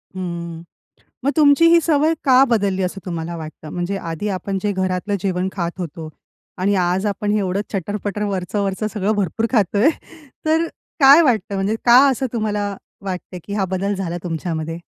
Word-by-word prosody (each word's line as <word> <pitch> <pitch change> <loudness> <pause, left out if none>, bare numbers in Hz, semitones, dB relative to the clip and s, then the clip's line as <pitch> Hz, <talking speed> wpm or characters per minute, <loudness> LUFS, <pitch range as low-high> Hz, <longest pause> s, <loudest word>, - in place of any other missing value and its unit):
हं, 170 -2 -5 0.6
मग 280 - +3
तुमची 295 +2 +6
ही 340 0 +7
सवय 310 0 +2
का 265 0 +6
बदलली 200 -4 +1
असं 185 +2 -3
तुम्हाला 170 -1 -4
वाटतं? 155 -1 -9
म्हणजे 180 +4 -3
आधी 170 +2 -4
आपण 195 0 -3
जे 205 - 0
घरातलं 185 +1 -1
जेवण 185 -1 -1
खात 170 -3 -2
होतो 165 -2 -6 0.5
आणि 195 +2 +1
आज 185 +2 +1
आपण 205 +1 -1
हे 210 - +2
एवढं 190 +1 -1
चटर-पटर 205 +2 -3
वरचं-वरचं 200 +1 -2
सगळं 210 0 0
भरपूर 205 +3 0
खातोय, 210 - +3 0.6
तर 325 +2 +2 0.4
काय 280 +5 +9
वाटतं 215 -7 +1
म्हणजे 195 +3 0
का 240 0 +8
असं 265 0 -1
तुम्हाला 210 -2 -1 0.3
वाटतंय 180 -1 -5
की 200 - -6
हा 200 -2 0
बदल 190 +2 -1
झाला 175 -2 -3
तुमच्यामध्ये? 165 -1 -3
195 Hz, 165 wpm, -20 LUFS, 180-215 Hz, 0.6 s, काय